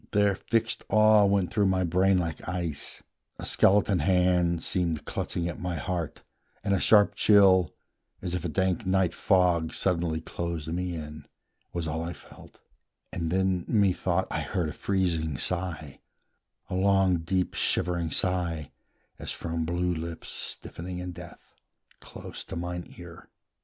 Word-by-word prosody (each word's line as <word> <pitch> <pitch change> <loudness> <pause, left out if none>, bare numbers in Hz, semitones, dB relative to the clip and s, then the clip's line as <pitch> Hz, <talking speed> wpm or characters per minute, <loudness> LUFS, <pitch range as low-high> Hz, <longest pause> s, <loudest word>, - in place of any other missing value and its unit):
Their 105 -1 +4
fixed 115 +3 -1
awe 110 -1 +6
went 100 -2 +1
through 105 -2 +3
my 95 -1 +2
brain 90 +2 +3
like 85 -3 -3
ice, 85 -5 -3 0.3
A - - -6
skeleton 100 -1 +4
hand 90 -2 +2
seemed 85 -4 -1
clutching 85 0 -3
at 85 - -5
my 90 -1 -3
heart, 85 -3 -4 0.4
And 100 - +1
a 95 - +2
sharp 105 +1 +5
chill, 95 -5 +5 0.4
as 90 -2 -4
if 90 -2 -2
a 85 - -2
dank 95 +6 0
night 95 -3 +1
fog 90 -5 +2
Suddenly 85 -3 0
closed 85 -1 -4
me 90 +1 -2
in, 75 -1 -8 0.4
was 85 -2 -3
all 80 +1 -2
I 85 +1 -4
felt: 70 - -16 0.5
And 85 -1 -2
then, 95 0 +1
methought, 95 -3 +2
I - - -1
heard 85 -4 -2
a - - -6
freezing 85 -7 0
sigh, 85 -5 -4 0.7
A - - -6
long, 95 -1 +3
deep, 90 +3 -1
shivering 85 -2 0
sigh, 85 -4 -1 0.5
as - - -5
from 85 -1 -3
blue 90 +2 0
lips 80 0 -6
Stiffening 90 +2 -5
in 90 0 -5
death, 85 0 -12 0.5
close - - -9
to - - -7
mine 90 +1 -4
ear. 85 0 -12
90 Hz, 150 wpm, -27 LUFS, 85-95 Hz, 0.7 s, awe